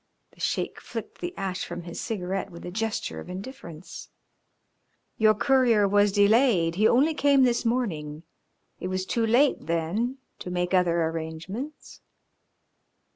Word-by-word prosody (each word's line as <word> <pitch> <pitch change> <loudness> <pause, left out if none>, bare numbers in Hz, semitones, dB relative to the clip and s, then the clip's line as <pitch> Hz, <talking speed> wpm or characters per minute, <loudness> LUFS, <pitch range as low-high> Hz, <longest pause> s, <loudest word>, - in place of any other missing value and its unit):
The - - -23
Sheik - - -2
flicked - - -7
the 350 - -3
ash 185 -1 -3
from 175 0 -6
his 170 0 -6
cigarette 195 -3 -3
with 170 -2 -11
a 175 - -5
gesture 220 +3 -3
of - - -10
indifference. 180 - -9 1.1
"Your 215 -1 +5
courier 235 -4 +3
was 205 +1 +4
delayed, 205 -4 +4
he 210 +5 +3
only 290 +6 +4
came 280 -2 +4
this 240 -1 +2
morning. 165 -11 -2 0.6
It - - -4
was 185 0 -2
too 225 +3 0
late 255 - +3
then 175 +11 -1 0.2
to - - -6
make 180 +1 -1
other 170 -2 +3
arrangements." 165 - -6
195 Hz, 140 wpm, -26 LUFS, 175-235 Hz, 1.1 s, Your